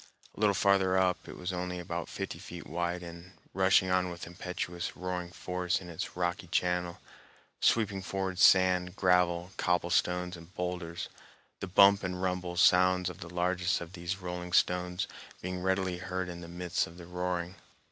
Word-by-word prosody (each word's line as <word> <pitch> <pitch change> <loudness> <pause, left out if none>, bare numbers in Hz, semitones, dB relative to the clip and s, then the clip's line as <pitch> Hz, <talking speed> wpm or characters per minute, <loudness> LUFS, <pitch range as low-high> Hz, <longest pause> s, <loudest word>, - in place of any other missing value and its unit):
A - - -12
little 105 -2 +3
farther 95 -1 +3
up 90 -1 +1
it - - -8
was 90 +1 -4
only 90 0 -3
about 85 -1 -4
fifty - - -5
feet - - -9
wide 85 +1 -2
and 85 +2 -10 0.2
rushing 95 0 +4
on 90 0 +2
with 85 -1 -7
impetuous 90 0 -5
roaring 90 -1 -3
force 90 +1 -2
in 90 -2 -9
its 85 - -5
rocky 90 0 -1
channel, 90 0 0 0.6
sweeping 105 -4 +2
forward 95 -1 -3
sand, 90 -1 +5
gravel, 90 -1 +2
cobblestones, 90 0 +1
and 85 +3 -14
boulders, 90 -2 -3 0.5
the 95 - -4
bump 100 +2 +6
and 90 0 -3
rumble 90 -1 -2
sounds 90 0 +5
of 90 - -13
the 85 -4 -8
largest 90 +1 +1
of 85 +1 -8
these 85 +1 -3
rolling 90 -1 -6
stones 90 +1 +2 0.3
being 90 0 -4
readily 95 -1 0
heard 95 0 -3
in 85 0 -7
the 85 - -8
midst 90 0 -1
of 85 - -13
the 85 - -10
roaring. 90 0 -3
90 Hz, 165 wpm, -31 LUFS, 90-95 Hz, 0.6 s, bump